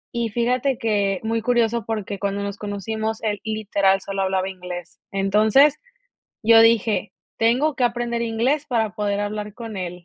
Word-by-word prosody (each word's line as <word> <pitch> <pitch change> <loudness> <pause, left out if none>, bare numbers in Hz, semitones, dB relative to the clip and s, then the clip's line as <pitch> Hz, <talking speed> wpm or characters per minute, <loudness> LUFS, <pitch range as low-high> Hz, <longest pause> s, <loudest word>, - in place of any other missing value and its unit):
Y 235 -1 0
fíjate 245 +4 0
que, 205 -5 0
muy 225 +1 -1
curioso, 235 -1 +1
porque 210 -3 -4
cuando 200 0 -2
nos 200 0 -4
conocimos, 220 +2 -4
él, 210 -2 -1
literal, 200 -3 +1
solo 195 0 -3
hablaba 190 0 0
inglés. 180 -2 -8
Entonces, 215 +9 +4 0.6
yo 225 +1 +7
dije: 225 -3 +3 0.3
"Tengo 255 +7 +2
que 250 - +1
aprender 240 0 -1
inglés 240 +6 0
para 225 -5 0
poder 205 -2 -1
hablar 210 0 -4
con 225 -3 -7
él". 180 -1 -6
220 Hz, 155 wpm, -22 LUFS, 200-235 Hz, 0.6 s, yo